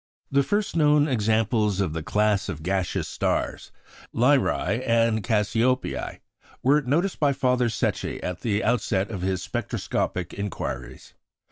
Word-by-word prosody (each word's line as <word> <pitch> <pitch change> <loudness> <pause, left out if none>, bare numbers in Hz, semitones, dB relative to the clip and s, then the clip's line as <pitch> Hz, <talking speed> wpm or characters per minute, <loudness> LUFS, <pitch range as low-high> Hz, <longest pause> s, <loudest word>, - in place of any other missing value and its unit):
The 140 0 +4
first 205 +9 -1
known 150 -2 +4
examples 110 -4 +1
of 95 -6 0
the 80 - -3
class 105 +4 +1
of 80 -1 -5
gaseous 95 0 -1
stars - - -2 0.4
Beta 120 - +1
Lyræ 125 -6 +2
and 115 -2 +2
Gamma 110 -1 +2
Cassiopeiæ 125 +5 -1 0.4
were 145 +3 +4
noticed 160 +8 0
by 145 -2 +3
Father 125 -2 +1
Secchi 110 - -2
at 90 -1 -4
the 105 -2 0
outset 110 -4 0
of 95 -4 -5
his 95 -1 -1
spectroscopic 90 -2 -3
inquiries. 65 -11 -5
110 Hz, 140 wpm, -25 LUFS, 95-130 Hz, 0.4 s, The